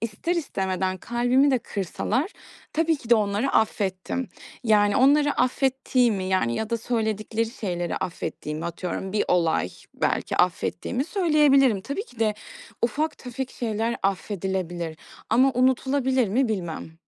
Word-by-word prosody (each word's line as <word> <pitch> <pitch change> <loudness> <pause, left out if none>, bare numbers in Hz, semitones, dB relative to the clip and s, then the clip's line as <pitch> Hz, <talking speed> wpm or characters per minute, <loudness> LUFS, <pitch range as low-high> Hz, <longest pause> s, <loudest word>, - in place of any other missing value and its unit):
ister 230 - -2
istemeden 190 - -1
kalbimi 245 +6 +2
de 260 - +3
kırsalar 220 - -2 0.4
tabii 325 0 +2
ki 240 -4 -13
de - - +9
onları 210 +4 +1
affettim. 210 +3 0 0.4
Yani, 205 -2 +4
onları 290 +2 +5
affettiğimi, 255 -6 +1
yani 185 -11 +1
ya 220 - -3
da 230 - +1
söyledikleri 220 -1 -1
şeyleri 180 -8 -3
affettiğimi, 155 -2 -4
atıyorum, 180 +3 -4
bir 210 - +1
olay 165 - +2 0.3
belki - - -1
affettiğimi 180 +7 0
söyleyebilirim. 295 - +4
Tabii 280 - -4
ki 245 - -19
de 215 -2 +2 0.5
ufak 290 +7 0
tefek 255 +1 -5
şeyler 225 0 -2
affedilebilir. 185 -4 -2 0.3
Ama 260 +3 +5
unutulabilir 260 0 +2
mi, 240 +5 +2
bilmem. 170 -6 -4
225 Hz, 125 wpm, -25 LUFS, 190-265 Hz, 0.5 s, de